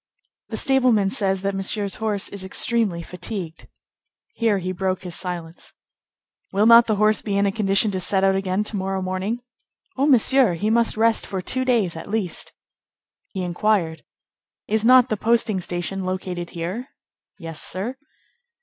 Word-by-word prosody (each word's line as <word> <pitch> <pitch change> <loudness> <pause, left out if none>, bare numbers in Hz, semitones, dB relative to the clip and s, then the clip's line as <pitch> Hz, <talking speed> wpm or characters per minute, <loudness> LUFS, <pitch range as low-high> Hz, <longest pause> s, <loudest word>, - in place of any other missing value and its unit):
"The - - -4
stableman 250 -7 +2
says 195 -2 0
that 200 0 0
Monsieur's 195 +1 -1
horse 215 -3 -1
is 200 -2 -7
extremely 195 -2 +1
fatigued." 180 -2 -6 0.7
Here 225 -3 +1
he 185 0 -3
broke 185 0 -2
his 180 -2 -6
silence. 175 -2 -6 0.8
"Will 200 +2 +2
not 230 +1 +8
the 215 - +1
horse 215 +1 +2
be 200 -2 -2
in 200 - +2
a 200 - +2
condition 200 0 +1
to 190 - -2
set 190 +1 +1
out 195 0 +4
again 190 +1 0
to 210 - -4
morrow 190 0 -2
morning?" 190 +6 -3 0.5
"Oh, 275 +2 +2
Monsieur! 260 - +4
he 210 +6 -1
must 230 -1 +2
rest 225 0 +2
for 190 - -3
two 260 +8 -1
days 225 -10 +1
at 165 - -8
least." 205 -5 -2 0.8
He 190 -3 -5
inquired:— 175 -2 0 0.7
"Is 220 +1 +1
not 255 +1 +6
the 215 - -1
posting 220 -3 +1
station 175 +2 -3
located 185 -2 -4
here?" 180 +10 -5 0.5
"Yes, 165 -4 -7
sir." 205 +8 -3
195 Hz, 160 wpm, -22 LUFS, 185-220 Hz, 0.8 s, not